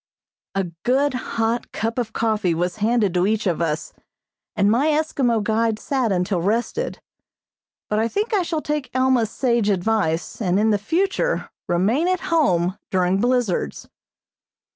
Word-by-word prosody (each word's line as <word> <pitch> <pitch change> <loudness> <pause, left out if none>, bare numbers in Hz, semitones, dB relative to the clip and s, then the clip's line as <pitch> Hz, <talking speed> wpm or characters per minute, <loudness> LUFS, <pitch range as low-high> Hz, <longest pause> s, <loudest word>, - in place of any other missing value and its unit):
A 195 - +1 0.2
good, 270 +3 +2
hot 235 -2 -2
cup 225 +2 -2
of 230 -3 -2
coffee 215 -7 0
was 175 +3 -1
handed 215 -3 +1
to 180 +1 +2
each 215 0 0
of 170 -3 0
us, 155 -2 -2 0.6
and 205 -1 +3
my 255 +7 +3
Eskimo 275 -7 +1
guide 220 +1 +1
sat 255 -2 -1
until 180 -1 0
rested, 220 +6 -1 0.9
but 210 - 0
I 225 - +2
think 420 - -2
I 405 - +3
shall 330 -3 -2
take 300 -3 -2
Alma's 255 -4 +3
sage 235 -4 +1
advice, 185 -3 0
and 185 -1 +2
in 215 0 +3
future 385 - 0 0.2
remain 215 - +2
at 365 -2 0
home 185 - +2
during 185 0 +1
blizzards. 240 - 0
225 Hz, 145 wpm, -22 LUFS, 190-255 Hz, 0.9 s, and